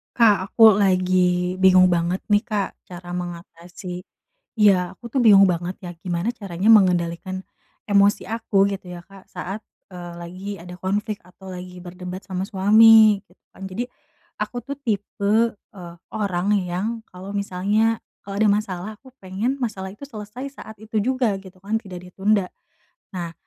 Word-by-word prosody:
Kak 205 Hz, -5 st, +4 dB
aku 225 Hz, -2 st, +8 dB
lagi 185 Hz, -2 st, +2 dB
bingung 185 Hz, -1 st, +7 dB
banget 175 Hz, +1 st, 0 dB
nih 205 Hz, 0 st, +5 dB
Kak, 210 Hz, -4 st, -2 dB, 0.2 s
cara 175 Hz, 0 st, -10 dB
mengatasi 175 Hz, +1 st, -7 dB, 0.6 s
iya, 190 Hz, -4 st, +4 dB
aku 235 Hz, +4 st, -11 dB
tuh 265 Hz, -, 0 dB
bingung 200 Hz, -3 st, +7 dB
banget 175 Hz, +1 st, -2 dB
ya 180 Hz, -, -7 dB
gimana 175 Hz, +3 st, -1 dB
caranya 200 Hz, -4 st, -2 dB
mengendalikan 185 Hz, -3 st, +3 dB, 0.5 s
emosi 200 Hz, 0 st, +3 dB
aku 210 Hz, -3 st, +1 dB
gitu 195 Hz, -1 st, -6 dB
ya 175 Hz, -, -8 dB
Kak, 195 Hz, -1 st, -15 dB
saat, 195 Hz, +4 st, -6 dB, 0.3 s
eee, 175 Hz, -2 st, -9 dB
lagi 185 Hz, +3 st, -8 dB
ada 180 Hz, +1 st, -9 dB
konflik 205 Hz, +3 st, -2 dB
atau 190 Hz, +1 st, -14 dB
lagi 180 Hz, 0 st, -8 dB
berdebat 180 Hz, +1 st, -8 dB
sama 185 Hz, -1 st, -4 dB
suami. 215 Hz, +1 st, +6 dB
Tuh 180 Hz, -, -25 dB, 0.2 s
kan -, -, -12 dB
jadi 220 Hz, +6 st, -4 dB, 0.5 s
aku 245 Hz, -, -3 dB
tuh 280 Hz, +4 st, -7 dB
tipe, 205 Hz, -5 st, -2 dB, 0.4 s
eee, 175 Hz, -3 st, -10 dB, 0.2 s
orang 195 Hz, -4 st, -1 dB
yang 180 Hz, +3 st, -3 dB, 0.2 s
kalau 185 Hz, +2 st, -9 dB
misalnya, 205 Hz, +3 st, +1 dB, 0.2 s
kalau 200 Hz, 0 st, -7 dB
ada 215 Hz, 0 st, +4 dB
masalah, 200 Hz, -2 st, -2 dB
aku 260 Hz, -, -16 dB
pengen 205 Hz, +6 st, -3 dB
masalah 210 Hz, -7 st, -4 dB
itu 210 Hz, +9 st, -10 dB
selesai 245 Hz, +2 st, -8 dB
saat 220 Hz, -, -11 dB
itu 220 Hz, 0 st, -2 dB
juga 250 Hz, -1 st, +1 dB
gitu 190 Hz, -1 st, -14 dB
kan, 220 Hz, +3 st, -1 dB
tidak 180 Hz, -3 st, -10 dB
ditunda. 200 Hz, +1 st, +1 dB, 0.7 s
Nah 170 Hz, -2 st, -4 dB
195 Hz, 155 wpm, -22 LUFS, 180-215 Hz, 0.7 s, aku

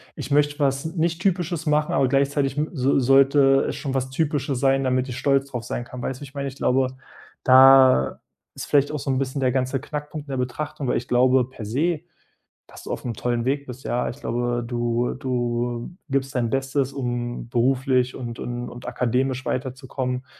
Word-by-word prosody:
„Ich -, -, -7 dB
möchte 145 Hz, 0 st, +2 dB
was 135 Hz, -1 st, +1 dB
nicht 165 Hz, +1 st, -1 dB
typisches 175 Hz, -4 st, -1 dB
machen, 150 Hz, 0 st, +2 dB
aber 135 Hz, -, +3 dB
gleichzeitig 140 Hz, +1 st, +1 dB
m 150 Hz, +1 st, 0 dB
so 135 Hz, -2 st, +2 dB
sollte 135 Hz, +1 st, +5 dB
es -, -, -3 dB
schon 135 Hz, -3 st, -4 dB
was 130 Hz, -1 st, -1 dB
Typisches 140 Hz, -2 st, -1 dB
sein, 135 Hz, +1 st, +2 dB
damit 130 Hz, 0 st, +1 dB
ich 125 Hz, -, -5 dB
stolz 135 Hz, -1 st, +2 dB
darauf 125 Hz, -4 st, -5 dB
sein 120 Hz, -, -3 dB
kann“, 125 Hz, +1 st, -9 dB
weißt 130 Hz, +1 st, -4 dB
du, -, -, -21 dB
wie -, -, -6 dB
ich 135 Hz, -, -15 dB
meine? 140 Hz, -1 st, -3 dB
Ich 135 Hz, -, -7 dB
glaube, 130 Hz, -1 st, +2 dB, 0.6 s
da 130 Hz, -, +6 dB, 0.4 s
ist -, -, -6 dB
vielleicht 145 Hz, 0 st, +2 dB
auch 150 Hz, -, -2 dB
so 135 Hz, -, -2 dB
'n 130 Hz, -, +1 dB
bisschen 135 Hz, +1 st, -2 dB
der 130 Hz, -1 st, +2 dB
ganze 130 Hz, +1 st, 0 dB
Knackpunkt 150 Hz, +1 st, -6 dB
in -, -, -7 dB
der 135 Hz, -, -2 dB
Betrachtung, 130 Hz, +3 st, -3 dB
weil -, -, +1 dB
ich 120 Hz, -, -5 dB
glaube 125 Hz, 0 st, +3 dB
per 130 Hz, -4 st, -10 dB
se, 155 Hz, +9 st, 0 dB, 0.7 s
dass -, -, -13 dB
du -, -, -6 dB
auf -, -, -4 dB
'nem 120 Hz, -, -2 dB
tollen 120 Hz, +1 st, -1 dB
Weg 140 Hz, +2 st, 0 dB
bist. 130 Hz, 0 st, -9 dB
Ja, 120 Hz, -, -1 dB
ich 130 Hz, -, -8 dB
glaube, 120 Hz, -2 st, -1 dB
du 120 Hz, 0 st, -1 dB
du 120 Hz, -1 st, -2 dB, 0.2 s
gibst 135 Hz, 0 st, -1 dB
dein 120 Hz, -2 st, +1 dB
Bestes, 135 Hz, 0 st, 0 dB
um 120 Hz, -3 st, -3 dB
beruflich 130 Hz, +1 st, +1 dB
und 120 Hz, -2 st, -6 dB
und 120 Hz, 0 st, -4 dB
und 120 Hz, +1 st, -11 dB
akademisch 125 Hz, +1 st, -1 dB
weiterzukommen. 130 Hz, -1 st, -3 dB
130 Hz, 205 wpm, -23 LUFS, 125-140 Hz, 0.7 s, da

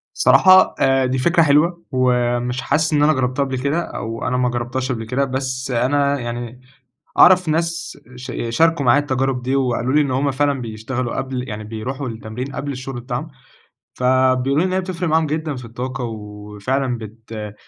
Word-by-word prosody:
صراحة 185 Hz, 0 st, +6 dB
آآ، 135 Hz, 0 st, +3 dB
دي 130 Hz, +1 st, 0 dB
فكرة 165 Hz, +6 st, +3 dB
حلوة 165 Hz, +4 st, +2 dB
ومش 125 Hz, -1 st, +1 dB
حاسس 155 Hz, +4 st, +1 dB
إن 145 Hz, -1 st, +3 dB
أنا 155 Hz, +1 st, +5 dB
جرّبتها 130 Hz, 0 st, 0 dB
قبْل 135 Hz, -1 st, -3 dB
كده 140 Hz, +6 st, 0 dB
أو 115 Hz, -6 st, -5 dB
أنا 125 Hz, 0 st, 0 dB
ما 125 Hz, -1 st, +1 dB
جرّبتهاش 120 Hz, +2 st, -3 dB
قبل 115 Hz, -3 st, -3 dB
كده، 130 Hz, +5 st, 0 dB
بس 130 Hz, 0 st, -3 dB
أنا 140 Hz, +3 st, +1 dB
يعني 120 Hz, +1 st, -6 dB, 0.6 s
أعرَف 180 Hz, -1 st, +7 dB
ناس 165 Hz, +1 st, -2 dB, 0.2 s
ش 125 Hz, 0 st, -7 dB, 0.2 s
شاركوا 160 Hz, +4 st, +2 dB
معايا 125 Hz, +4 st, +5 dB
التجارب 135 Hz, -2 st, -1 dB
دي 130 Hz, +2 st, 0 dB
وقالو 125 Hz, -1 st, 0 dB
لي 150 Hz, -, +4 dB
إن 140 Hz, -3 st, 0 dB
هُم 135 Hz, +2 st, +1 dB
فعلًا 140 Hz, 0 st, 0 dB
بيشتغلوا 115 Hz, +2 st, -4 dB
قبْل 130 Hz, -1 st, -4 dB
يعني 110 Hz, 0 st, -6 dB
بيروحوا 125 Hz, +5 st, -5 dB
التمرين 115 Hz, +4 st, -6 dB
قبل 140 Hz, 0 st, -3 dB
الشغل 130 Hz, -1 st, -6 dB
بتاعهم، 125 Hz, +5 st, -4 dB, 0.7 s
فبيقولوا 130 Hz, +3 st, +2 dB
لي -, -, +1 dB
إن -, -, -2 dB
هي 185 Hz, -, +2 dB
بتفرِق 180 Hz, -2 st, -3 dB
معاهم 160 Hz, +1 st, +3 dB
جدًا 155 Hz, 0 st, -2 dB
في 125 Hz, -1 st, -8 dB
الطاقة 125 Hz, +3 st, -5 dB
وفعلًا 110 Hz, +4 st, -3 dB
بت 110 Hz, -1 st, -8 dB
130 Hz, 175 wpm, -20 LUFS, 120-145 Hz, 0.7 s, أعرَف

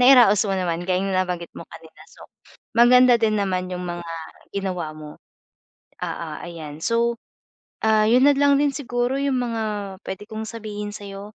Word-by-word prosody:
nairaos 245 Hz, -6 st, +7 dB
mo -, -, 0 dB
naman 175 Hz, -2 st, -1 dB
gaya 185 Hz, 0 st, +1 dB
ng 195 Hz, -, -1 dB
nabanggit 180 Hz, -2 st, -1 dB
mo -, -, -8 dB
kanina, 160 Hz, -1 st, -14 dB
so -, -, -14 dB, 0.5 s
maganda 245 Hz, +1 st, +7 dB
din 215 Hz, -1 st, +2 dB
naman 185 Hz, -2 st, -1 dB
'yung 180 Hz, 0 st, -4 dB
mga 175 Hz, 0 st, -5 dB, 0.5 s
ginawa 180 Hz, -5 st, -3 dB
mo. 150 Hz, -1 st, -10 dB, 0.9 s
Oo, -, -, -4 dB
ayan. 155 Hz, -4 st, -8 dB
So, 235 Hz, 0 st, +1 dB, 0.7 s
ah, 215 Hz, -1 st, +4 dB
'yun 250 Hz, +3 st, +5 dB
na 290 Hz, -, +6 dB
lang 285 Hz, -1 st, +4 dB
din 290 Hz, -1 st, +2 dB
siguro 245 Hz, -2 st, -1 dB
'yung 275 Hz, -2 st, 0 dB
mga 230 Hz, -2 st, -2 dB, 0.4 s
puwede 195 Hz, +2 st, -6 dB
kong 220 Hz, 0 st, -5 dB
sabihin 210 Hz, -2 st, -6 dB
sa'yo 200 Hz, +1 st, -9 dB
210 Hz, 165 wpm, -23 LUFS, 180-240 Hz, 0.9 s, nairaos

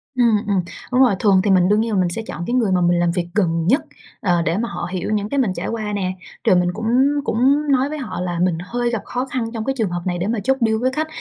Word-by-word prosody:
Ừm, 235 Hz, -4 st, +4 dB
ừm, 195 Hz, -3 st, +2 dB, 0.3 s
đúng 250 Hz, +1 st, +3 dB
rồi, 245 Hz, -6 st, +5 dB
thường 195 Hz, -3 st, +4 dB
thì 205 Hz, -, +2 dB
mình 185 Hz, -1 st, +4 dB
đương 210 Hz, +1 st, +3 dB
nhiên 220 Hz, -4 st, 0 dB
mình 180 Hz, -1 st, +2 dB
sẽ 205 Hz, +6 st, -4 dB
chọn 165 Hz, -, -5 dB
cái 240 Hz, -, -2 dB
người 230 Hz, -6 st, +2 dB
mà 180 Hz, -, +2 dB
mình 175 Hz, 0 st, +3 dB
làm 175 Hz, -1 st, +2 dB
việc 175 Hz, -1 st, -2 dB
gần 165 Hz, -5 st, +1 dB
nhất, 270 Hz, +10 st, +4 dB, 0.4 s
ờ, 175 Hz, -3 st, +2 dB
để 165 Hz, +2 st, 0 dB
mà 235 Hz, +1 st, -2 dB
họ -, -, -4 dB
hiểu 185 Hz, +2 st, -3 dB
những 210 Hz, 0 st, -1 dB
cái 280 Hz, -, -2 dB
mình 230 Hz, -8 st, +1 dB
trải -, -, -4 dB
qua 215 Hz, -2 st, -3 dB
nè. 190 Hz, -2 st, -1 dB, 0.3 s
Rồi -, -, +4 dB
mình 180 Hz, 0 st, +2 dB
cũng 225 Hz, +3 st, -5 dB, 0.4 s
cũng 280 Hz, +5 st, +2 dB
nói 270 Hz, +1 st, +2 dB
với 305 Hz, -, -4 dB
họ 255 Hz, -9 st, -5 dB
là 175 Hz, -2 st, -3 dB
mình 180 Hz, -2 st, +1 dB
hơi 240 Hz, +4 st, -1 dB
gặp 230 Hz, -3 st, -2 dB
khó 250 Hz, +1 st, -3 dB
khăn 255 Hz, -3 st, -3 dB
trong 220 Hz, -2 st, -4 dB
cái 270 Hz, -, 0 dB
trường 220 Hz, -5 st, 0 dB
hợp 175 Hz, 0 st, -3 dB
này 180 Hz, -1 st, -1 dB
để 180 Hz, +3 st, -2 dB
mà 225 Hz, 0 st, -1 dB
chốt 265 Hz, +4 st, +2 dB
deal 220 Hz, 0 st, +1 dB
với 255 Hz, +3 st, 0 dB
khách. 310 Hz, +4 st, -2 dB
210 Hz, 295 wpm, -20 LUFS, 180-245 Hz, 0.4 s, rồi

